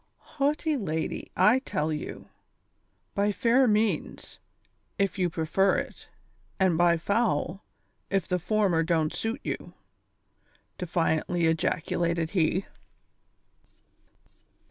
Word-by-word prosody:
" - - -47 0.2
Haughty 300 +2 +1
lady, 160 -8 -3
I'll 210 +8 +5
tell 155 - -2
you; 150 - -6 0.9
by 205 +1 +1
fair 245 +4 +3
means, 215 0 -1 0.6
if 195 -1 0
yoi; 180 -1 +2
pre 160 -1 -3
fer 195 +4 +3
it; - - -6 0.5
and 190 -3 +3
by 170 0 +4
foul, 200 0 0 0.5
if 195 -3 0
the 180 -1 0
former 190 -2 +2
don't 160 -2 +1
suit 225 +5 -3
you," - - -5 1.0
defiantly 170 -1 0
ejaculated 165 +1 0
he. 185 +1 +1
180 Hz, 105 wpm, -27 LUFS, 165-210 Hz, 1.0 s, I'll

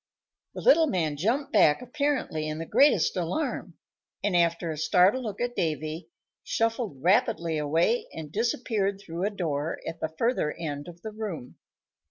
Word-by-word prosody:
The - - -5
little 330 -10 +6
man 160 - 0
jumped 230 - -1
back 160 -8 +5
apparently 260 - -1
in 155 0 -3
the 165 - -4
greatest 285 - +4
alarm, 185 - -2 0.5
and, 200 -3 +1
after 170 -1 +2
a 155 - -5
startled 190 +9 +4
look 210 -3 -5
at 245 0 -2
Davy, 155 +1 -2 0.3
shuffled 225 - -1
rapidly 180 -5 +2
away 165 +11 +1
and 155 -2 -8
disappeared 215 -2 -1
through 175 -1 -4
a - - +2
door 160 -6 -2
at 165 - -5
the 160 - -2
further 230 -10 +1
end 145 -3 -5
of 175 0 -12
the 220 - -5
room. 205 - -6
180 Hz, 160 wpm, -27 LUFS, 160-230 Hz, 0.5 s, little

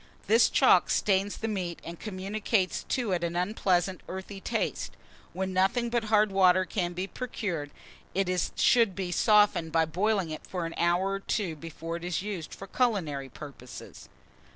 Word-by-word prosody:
This 225 +3 +5
chalk - - +5
stains 200 0 +1
the 225 - -3
meat, 185 -5 -3
and 170 0 -8
communicates 200 0 -1
to 245 -6 -1
it 175 -2 0
an 170 0 -2
unpleasant 185 -1 0
earthy 190 +1 -7
taste. - - -2 0.3
When 190 0 -3
nothing 235 +6 +1
but 235 -2 0
hard 215 -1 +3
water 185 -1 +4
can 180 -2 -2
be 180 +2 -3
procured, 195 - -4 0.5
it 195 0 +1 0.3
should 230 -6 +4
be 185 -2 -3
softened 205 -5 +3
by 165 0 +3
boiling 190 +1 0
it 155 - -5
for 180 -3 -3
an 165 - -5
hour 175 +3 +1
or 195 - -2
two 195 -4 -2
before 165 +1 -6
it 170 - -11
is 175 -1 -2
used 195 -6 -5
for 195 - -8
culinary 180 - -1
purposes. 135 -3 -11
190 Hz, 165 wpm, -28 LUFS, 170-210 Hz, 0.5 s, This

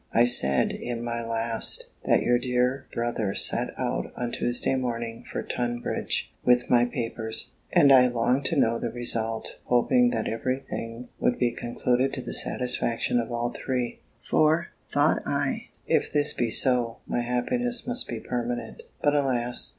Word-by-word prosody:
I 115 - +6
said, 70 - +4
in 120 -1 -5
my 115 0 -3
last, 115 0 -1
that - - +3
your 120 0 +3
dear 125 +2 0
brother 115 -4 -2
set - - +1
out - - -2
on 120 -1 -2
Tuesday 120 +2 0
morning 115 -3 -3
for - - -3
Tunbridge 120 -1 -2
with 125 0 +3
my 120 -1 +5
papers; 115 -3 -4 0.2
and 140 - +6
I 125 -1 +7
longed 125 +3 +1
to 165 - 0
know 115 -5 +2
the - - -2
result, 115 -2 -2
hoping 245 - +3
that 250 - -2
every 130 +3 -1
thing 115 +2 -6
would 125 - +1
be 120 -1 +1
concluded 125 +3 0
to 130 - -4
the - - -6
satisfaction 125 -1 +1
of 115 0 -3
all 120 0 -1
three: 125 -2 -3 0.2
"For," 155 +2 +2 0.2
thought - - +2
I, - - -1 0.2
"if - - +1
this 150 0 +2
be 120 - -1
so, 120 -1 +2
my 120 - -1
happiness 235 - -1
must 245 0 +2
be 115 - -4
permanent:" 120 - -4 0.2
but 145 - +4
alas! 125 -4 0
120 Hz, 160 wpm, -26 LUFS, 115-130 Hz, 0.2 s, I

